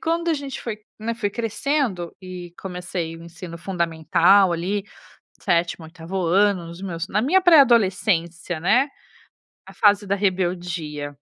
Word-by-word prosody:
quando 335 +1 0
a - - +2
gente 280 -2 -5
foi, 220 -3 -4 0.2
né, 225 +2 -2
foi 225 -3 -2
crescendo, 225 - -2
e 180 -2 -9
comecei 180 -3 -5
o - - -12
ensino 170 0 -9
fundamental 170 +2 +3
ali, 180 +4 -1 0.6
7º, 170 -1 0
8º 170 +3 -6
ano, 190 0 +2
nos 170 +3 -10
meus, 180 -1 -4
na 210 +2 0
minha 360 +10 +4
pré-adolescência, 195 - +3
né. 240 - +3 0.8
A - - -13
fase 205 -1 +3
da 195 - +1
rebeldia. 175 -6 -2
185 Hz, 140 wpm, -23 LUFS, 170-215 Hz, 0.8 s, minha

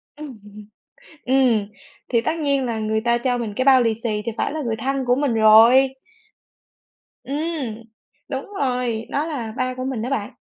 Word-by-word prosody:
Ừm. 285 -7 -10 0.9
Ừm, 250 -5 +2 0.4
thì 235 -2 +2
tất 315 +8 -2
nhiên 280 -3 0
là 230 -2 -2
người 220 0 -1
ta 235 +1 +1
cho 245 0 -1
mình 225 -3 -4
cái 255 - 0
bao 260 -2 +6
lì 225 -1 +1
xì 210 -2 -1
thì 230 - -2
phải - - -1
là 310 - -4
người 225 -3 -2
thân 270 +2 -2
của 245 - +4
mình 275 -4 0
rồi. 230 +5 +6 1.3
Ừm, 280 -6 -4 0.5
đúng 270 -1 -4
rồi! 250 -4 -1
Đó 290 +3 -1
là 245 -9 -4
ba 255 0 -1
của 255 - -4
mình 260 -5 -3
á 250 - -3
bạn. 255 -3 -2
250 Hz, 185 wpm, -21 LUFS, 225-270 Hz, 1.3 s, bao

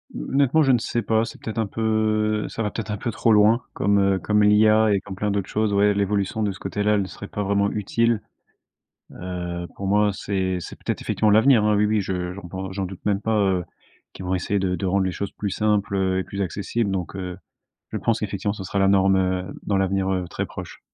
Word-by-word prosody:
Honnêtement 140 - +2
je 135 - +4
ne 125 - +5
sais 120 0 -2
pas, 110 0 +1
c'est - - -10
peut-être 110 - -6
un 110 - +1
peu, 110 0 0
ça 115 - -3
va 105 - -2
peut-être 110 -2 -5
un 105 - -2
peu 115 +3 -3
trop 115 0 +2
loin 110 +3 +5
comme, 100 0 +2
heu, 95 -1 +2
comme 105 +1 +2
l'IA 110 +1 +5
et 100 - +2
comme 100 -2 -8
plein 105 +2 -1
d'autres 100 -2 -2
choses. 110 -1 0
Ouais, 100 +1 +4
l'évolution 100 +1 0
de 105 - 0
ce 95 - -10
côté-là, 105 +2 0
elle 105 - +2
ne 95 - -3
serait 100 +3 -9
pas 105 - -3
vraiment 100 0 +1
utile. 115 +2 0 0.9
Heu, 90 -1 -5
pour 100 - -4
moi, 105 +1 +3
c'est 95 -1 -2
c'est - - -8
peut-être - - -3
effectivement 110 - +1
l'avenir, 110 +1 +5
hein, 105 -1 +3
oui, 105 - +3
oui 105 0 +1
je 90 -2 -3
j'en 90 -1 -9
pen 95 +2 -5
j'en 95 0 -3
doute 90 0 -10
même 100 -1 +1
pas, 110 0 0
heu, 95 -3 +1 0.5
qu'ils 95 - -8
vont 90 - -1
essayer 100 +2 0
de 95 -1 0
de 95 - -3
rendre 95 +1 +2
les 95 - -1
choses 100 +1 -4
plus 100 - -4
simples, 105 -1 0
heu, 95 -1 +1
et - - -4
plus 100 - -6
accessibles. 100 +3 -2
Donc, 95 -2 -3
heu, 90 -2 -5 0.6
je - - -2
pense 115 -1 0
qu'effectivement, 100 -1 -2
ce 105 - -7
sera 100 - -2
la 95 - +4
norme, 95 -1 +4
heu, 95 0 -1
dans 100 - 0
l'avenir, 95 0 0
heu, 90 -1 -1
très - - -3
proche. - - -9
100 Hz, 240 wpm, -23 LUFS, 95-105 Hz, 0.9 s, ne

